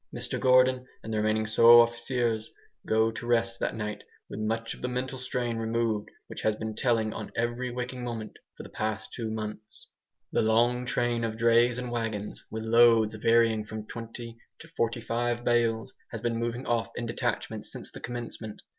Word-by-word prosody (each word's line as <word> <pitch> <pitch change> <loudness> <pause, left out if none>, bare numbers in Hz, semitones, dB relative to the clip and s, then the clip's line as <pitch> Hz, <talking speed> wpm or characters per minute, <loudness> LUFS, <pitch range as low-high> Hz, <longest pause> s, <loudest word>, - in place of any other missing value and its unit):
Mr - - -3
Gordon 130 0 +4 0.2
and 110 - -5
the - - 0
remaining 110 0 +1
"sous 115 +2 +8
officiers" 120 -2 -2 0.4
go 110 +1 +3
to 115 +1 -7
rest 115 -1 +1
that - - -1
night 105 -1 -4 0.3
with 100 - -5
much 115 +1 -2
of - - -13
the 125 - -1
mental 125 +1 -3
strain 125 -2 -2
removed 115 -2 -1 0.2
which - - -8
has 110 - +2
been 110 0 -4
telling 110 -2 +1
on - - -6
every 120 +2 -1
waking 125 +1 -4
moment 115 -3 -5 0.2
for - - -8
the - - -12
last 110 0 -2
two 115 -2 -3
months. 110 0 -7 0.4
The - - +2
long 120 +3 +2
train 120 0 0
of 110 -1 -2
drays 115 +1 +4
and 125 -1 -4
wagons, 110 -3 -3
with 110 0 -5
loads 115 -1 +5
varying 115 0 +3
from 110 0 -7
twenty 115 0 -8 0.2
to 165 - -12
forty 115 -6 -1
five 120 +1 -1
bales, 120 0 +1 0.2
has 115 - -5
been 115 -1 -1
moving 120 +2 -2
off 120 -1 0
in 120 - -3
detachments 115 - -3
since - - -8
the - - -9
commencement. 115 -3 -6
115 Hz, 180 wpm, -28 LUFS, 110-120 Hz, 0.4 s, sous